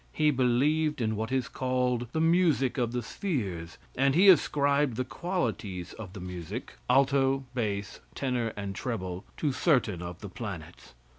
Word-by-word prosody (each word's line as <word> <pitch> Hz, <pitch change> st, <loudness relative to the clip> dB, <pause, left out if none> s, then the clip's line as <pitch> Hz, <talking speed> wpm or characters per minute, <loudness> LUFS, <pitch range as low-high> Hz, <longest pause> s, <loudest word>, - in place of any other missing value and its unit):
He 150 Hz, -1 st, +3 dB
believed 145 Hz, +4 st, +2 dB
in 110 Hz, -2 st, 0 dB
what 110 Hz, +3 st, -3 dB
is 130 Hz, -1 st, 0 dB
called 125 Hz, -2 st, 0 dB
the 160 Hz, -, -1 dB
music 160 Hz, -6 st, +3 dB
of 120 Hz, -2 st, 0 dB
the 125 Hz, 0 st, -2 dB
spheres, 100 Hz, -, -3 dB, 0.2 s
and 135 Hz, +1 st, +3 dB
he 190 Hz, +4 st, +7 dB
ascribed 145 Hz, -5 st, +4 dB
the 130 Hz, -, 0 dB
qualities 115 Hz, -, -3 dB
of 100 Hz, -5 st, -9 dB
the 100 Hz, -, -7 dB
music 90 Hz, -2 st, -6 dB, 0.2 s
alto, 135 Hz, +1 st, +3 dB
bass, 105 Hz, -5 st, -2 dB, 0.2 s
tenor 125 Hz, -4 st, -1 dB
and 100 Hz, -1 st, -4 dB
treble 95 Hz, -4 st, -4 dB
to 150 Hz, -, +1 dB
certain 125 Hz, -, +2 dB
of 85 Hz, 0 st, -7 dB
the 100 Hz, -, -6 dB
planets. 95 Hz, -, -8 dB
125 Hz, 155 wpm, -29 LUFS, 100-140 Hz, 0.2 s, he